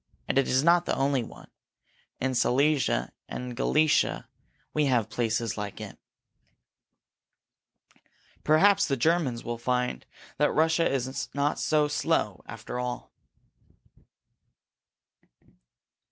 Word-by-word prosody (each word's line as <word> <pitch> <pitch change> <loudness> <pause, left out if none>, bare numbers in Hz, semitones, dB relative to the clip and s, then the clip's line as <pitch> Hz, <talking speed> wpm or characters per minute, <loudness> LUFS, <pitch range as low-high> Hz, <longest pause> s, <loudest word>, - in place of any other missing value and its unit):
And - - +2
it 135 - +1
is 130 +2 +2
not 170 +1 +4
the - - 0
only 135 -1 +1
one. 115 - -12 0.7
In 130 0 -1
Silesia 130 - +1 0.2
and 125 - -5
in - - -6
Galicia 150 +5 +1 0.5
we 150 -1 +1
have 120 -5 +1
places 115 -2 -1
like 100 -1 -6
it." - - -9 2.4
"Perhaps 200 +6 +4
the 135 -3 0
Germans 145 -4 +1
will 120 -1 -5
find 125 - -2 0.3
that 150 +1 +3
Russia 160 +2 +2
is 130 0 -3
not 145 +1 0
so 150 -1 +2
slow 145 - -1
after 125 - -7
all!" 125 0 -5
135 Hz, 110 wpm, -27 LUFS, 125-155 Hz, 2.4 s, not